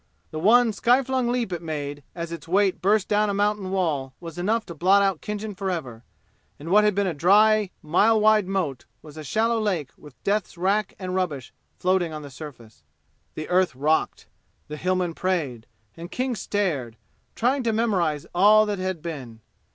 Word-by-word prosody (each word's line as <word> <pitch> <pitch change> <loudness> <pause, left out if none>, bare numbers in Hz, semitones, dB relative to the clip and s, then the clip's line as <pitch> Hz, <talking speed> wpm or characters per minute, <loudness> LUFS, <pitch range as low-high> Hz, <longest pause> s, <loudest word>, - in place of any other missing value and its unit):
The 155 - -4
one 225 +5 +4
sky 245 +6 +3
flung 260 -1 -1
leap 240 -5 -1
it 175 - -4
made 145 -3 -5
as 170 -1 -5
its 170 0 -8
weight 190 +2 +2
burst 205 +1 +2
down 210 0 +2
a 200 - -1
mountain 205 -1 0
wall 155 -9 -1
was 170 -1 -8
enough 220 +5 0
to 170 - -8
blot 190 +5 +4
out 195 -5 0
Khinjan 210 0 -5
forever, 165 - -4 0.5
and 155 +3 -8
what 210 +3 +5
had 210 -2 +2
been 200 0 +1
a 180 - -1
dry 210 +6 +4
mile 210 +8 +3
wide 215 -2 +4
moat 180 -10 -2 0.2
was 150 -1 -13
a 155 - -8
shallow 225 +8 +1
lake 180 -10 -1
with 145 -4 -16
death's 200 -3 -1
rack 195 +3 0
and 185 -1 -5
rubbish 165 -9 -3 0.2
floating 180 -3 +1
on 155 -1 -6
the 140 - -10
surface. 125 - -11 0.5
The 155 - -5
earth 180 -5 +2
rocked. 150 +4 0 0.4
The 150 - -6
Hillmen 180 0 -1
prayed, 155 -12 -2 0.3
and 170 +1 -9
King 255 +4 -2
stared, 155 - -2 0.4
trying 260 +4 +1
to 235 -2 0
memorize 190 -10 0
all 210 +4 +6
that 205 -2 -3
had 185 -4 -3
been. 130 -9 -7
185 Hz, 180 wpm, -24 LUFS, 155-210 Hz, 0.5 s, all